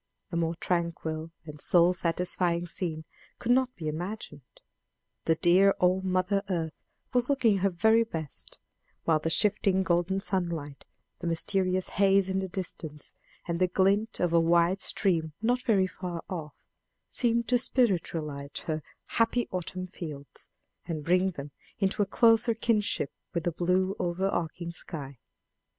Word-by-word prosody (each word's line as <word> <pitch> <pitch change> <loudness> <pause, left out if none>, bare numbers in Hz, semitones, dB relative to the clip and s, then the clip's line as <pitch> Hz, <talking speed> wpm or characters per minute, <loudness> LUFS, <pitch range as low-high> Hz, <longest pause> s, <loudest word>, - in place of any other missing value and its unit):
A - - -3
more 165 0 0
tranquil 165 -2 -2 0.2
and 150 -2 -9
soul 175 0 +5
satisfying 175 0 0
scene 160 -2 -4 0.3
could 240 - -1
not 255 0 +3
be 160 - -5
imagined: 165 -1 -5 0.8
the 165 - +3
dear 185 +4 +5
old 180 +1 +3
mother 185 +2 +1
earth 165 -4 -1 0.4
was 245 +1 +2
looking 235 -8 +3
her 195 +1 +2
very 220 +6 +4
best; 160 -10 -6 0.5
while 160 -2 +3
the 165 - -1
shifting 195 +1 +2
golden 175 +2 +1
sunlight, 170 -8 -3 0.3
the 175 - -4
mysterious 185 +2 0
haze 195 -1 +3
in 190 0 0
the 190 - -2
distance, 165 -5 -5 0.3
and 170 -1 -1
the 185 - +4
glint 195 +4 +1
of 175 -1 +1
a 170 - +6
wide 170 +3 +3
stream 165 -5 +1
not 245 +3 +1
very 200 -6 +3
far 180 -2 -5
off, 155 -5 -6 0.5
seemed 235 -1 +1
to 245 -1 +4
spiritualize 165 - 0 0.2
her 155 -1 -2 0.2
"happy 230 +1 +1
autumn 185 0 -4
fields," 155 -6 -8 0.4
and 155 -3 -3
bring 180 +2 +3
them 145 -5 -8 0.3
into 195 +1 0
a 200 - +2
closer 225 +2 +4
kinship 215 - 0 0.2
with 170 - 0
the 175 - 0
blue 185 +3 +1
over 180 +1 0
arching 170 -1 -3
sky. 140 -6 -6
180 Hz, 145 wpm, -29 LUFS, 165-195 Hz, 0.8 s, a